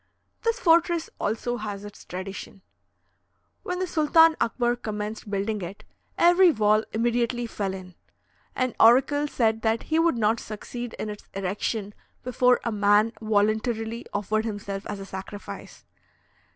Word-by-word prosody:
This 460 Hz, +1 st, 0 dB
fortress 340 Hz, -4 st, +3 dB
also 230 Hz, +3 st, -1 dB
has 205 Hz, -2 st, -6 dB
its 205 Hz, -, -12 dB
tradition: 190 Hz, +1 st, -7 dB, 1.0 s
"When 360 Hz, -, -3 dB
the 370 Hz, -, -1 dB
Sultan 325 Hz, 0 st, +5 dB
Akbar 240 Hz, +1 st, +1 dB
commenced 210 Hz, -2 st, -5 dB
building 205 Hz, +1 st, -2 dB
it, 180 Hz, +3 st, -7 dB, 0.3 s
every 355 Hz, +2 st, +6 dB
wall 215 Hz, -5 st, +3 dB
immediately 240 Hz, +1 st, 0 dB
fell 200 Hz, -4 st, -3 dB
in. 185 Hz, -1 st, -10 dB, 0.6 s
An 255 Hz, -2 st, 0 dB
oracle 270 Hz, +5 st, +5 dB
said 225 Hz, -5 st, +1 dB
that 225 Hz, +1 st, 0 dB
he 315 Hz, +1 st, 0 dB
would 330 Hz, -5 st, +3 dB
not 225 Hz, +1 st, +2 dB
succeed 240 Hz, +2 st, -7 dB
in 215 Hz, -, -4 dB
its 210 Hz, -, -11 dB
erection 200 Hz, +2 st, -2 dB, 0.3 s
before 250 Hz, 0 st, +3 dB
a 235 Hz, -, -1 dB
man 210 Hz, +2 st, +3 dB
voluntarily 220 Hz, +2 st, 0 dB
offered 210 Hz, +2 st, -1 dB
himself 205 Hz, -2 st, -5 dB
as 205 Hz, -, -5 dB
a 195 Hz, -, -7 dB
sacrifice. 195 Hz, +2 st, -9 dB
220 Hz, 140 wpm, -26 LUFS, 205-250 Hz, 1.0 s, every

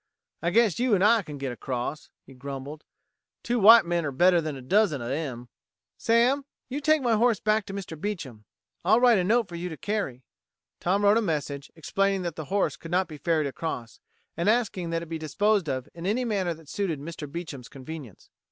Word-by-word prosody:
"I 170 Hz, -, +1 dB
guess 220 Hz, 0 st, +3 dB
you 245 Hz, -3 st, +3 dB
and 190 Hz, -, +1 dB
I 225 Hz, +2 st, +5 dB
can 150 Hz, -6 st, -8 dB
get 135 Hz, -2 st, -3 dB
across," 125 Hz, +4 st, -4 dB, 0.2 s
he 135 Hz, -, -14 dB
grumbled. 140 Hz, +3 st, -7 dB, 0.6 s
"Two 240 Hz, 0 st, 0 dB
white 225 Hz, +1 st, +9 dB
men're 170 Hz, -4 st, -1 dB
better 175 Hz, +7 st, +4 dB
'an 155 Hz, -3 st, -1 dB
a -, -, -9 dB
dozen 190 Hz, 0 st, +2 dB
of 120 Hz, +1 st, -4 dB
'em." 135 Hz, -5 st, -4 dB, 0.5 s
"Sam, 240 Hz, +5 st, +2 dB, 0.3 s
you 280 Hz, +3 st, -3 dB
take 310 Hz, -1 st, +3 dB
my 240 Hz, -2 st, +2 dB
horse 230 Hz, 0 st, +3 dB
back 215 Hz, 0 st, +1 dB
to 195 Hz, -, -6 dB
Mr. 170 Hz, -6 st, -7 dB
Beecham. 135 Hz, -, -5 dB, 0.4 s
I'll 215 Hz, +6 st, +5 dB
write 240 Hz, -4 st, +5 dB
a -, -, +1 dB
note 225 Hz, +3 st, +2 dB
for 175 Hz, -, -13 dB
you 170 Hz, +1 st, -4 dB
to 160 Hz, -, -7 dB
carry." 170 Hz, -, -3 dB, 0.6 s
Tom 195 Hz, +4 st, +1 dB
wrote 205 Hz, +2 st, +5 dB
a -, -, 0 dB
message, 145 Hz, -6 st, -3 dB
explaining 195 Hz, +3 st, 0 dB
that 175 Hz, -, -3 dB
the 155 Hz, -, -6 dB
horse 195 Hz, +5 st, 0 dB
could 165 Hz, -, -10 dB
not 180 Hz, +1 st, +1 dB
be 155 Hz, -2 st, -9 dB
ferried 160 Hz, 0 st, +1 dB
across, 135 Hz, -5 st, -5 dB, 0.4 s
and 170 Hz, +5 st, +1 dB
asking 210 Hz, -7 st, 0 dB
that 165 Hz, 0 st, -2 dB
it -, -, -7 dB
be 165 Hz, 0 st, -5 dB
disposed 195 Hz, +3 st, +1 dB
of 130 Hz, -2 st, -3 dB
in 170 Hz, +2 st, -6 dB
any 245 Hz, +5 st, 0 dB
manner 190 Hz, -7 st, -1 dB
that 160 Hz, -1 st, -17 dB
suited 175 Hz, -4 st, -2 dB
Mr. 150 Hz, -1 st, -7 dB
Beecham's 155 Hz, -6 st, -7 dB
convenience. 135 Hz, -, -10 dB
170 Hz, 205 wpm, -27 LUFS, 145-210 Hz, 0.6 s, white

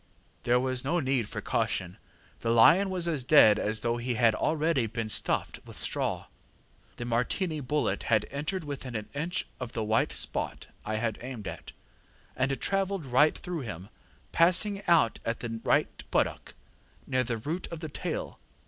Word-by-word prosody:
ŌĆ£There 120 Hz, +1 st, +4 dB
was 130 Hz, 0 st, +1 dB
no 170 Hz, +6 st, +1 dB
need 130 Hz, -6 st, 0 dB
for -, -, -5 dB
caution; 90 Hz, -1 st, -2 dB, 0.4 s
the 115 Hz, -, -2 dB
lion 165 Hz, -, +6 dB
was 180 Hz, -2 st, -1 dB
as 155 Hz, -6 st, 0 dB
dead 120 Hz, -6 st, +6 dB
as 110 Hz, +1 st, -1 dB
though 120 Hz, 0 st, 0 dB
he 120 Hz, +1 st, -2 dB
had 115 Hz, -1 st, +4 dB
already 155 Hz, -1 st, +1 dB
been 115 Hz, 0 st, -4 dB
stuffed -, -, -1 dB
with -, -, -12 dB
straw. -, -, -2 dB, 0.7 s
The 120 Hz, -, -6 dB
Martini 140 Hz, +8 st, 0 dB
bullet 140 Hz, -7 st, -1 dB
had 110 Hz, -2 st, +3 dB
entered 155 Hz, +6 st, -3 dB
within 135 Hz, -4 st, -6 dB
an 105 Hz, -1 st, -4 dB
inch 165 Hz, +5 st, -1 dB
of 125 Hz, -2 st, -6 dB
the 110 Hz, -, -2 dB
white 110 Hz, +1 st, +1 dB
spot -, -, -2 dB, 0.2 s
I 110 Hz, -, -3 dB
had 110 Hz, 0 st, -2 dB
aimed 120 Hz, -5 st, -7 dB
at, -, -, -7 dB, 0.6 s
and 135 Hz, +1 st, 0 dB
travelled 195 Hz, -3 st, 0 dB
right 135 Hz, +4 st, +3 dB
through 180 Hz, -2 st, -5 dB
him, 100 Hz, -, -7 dB, 0.4 s
passing 195 Hz, +4 st, +4 dB
out 160 Hz, -10 st, +4 dB
at 115 Hz, 0 st, -3 dB
the 115 Hz, -1 st, -4 dB
right -, -, +1 dB
buttock, -, -, -1 dB, 0.5 s
near 130 Hz, -1 st, +1 dB
the 115 Hz, -2 st, -2 dB
root 155 Hz, +11 st, -4 dB
of 170 Hz, -, -7 dB
the 160 Hz, -, -5 dB
tail. -, -, -4 dB
130 Hz, 170 wpm, -29 LUFS, 115-160 Hz, 0.7 s, lion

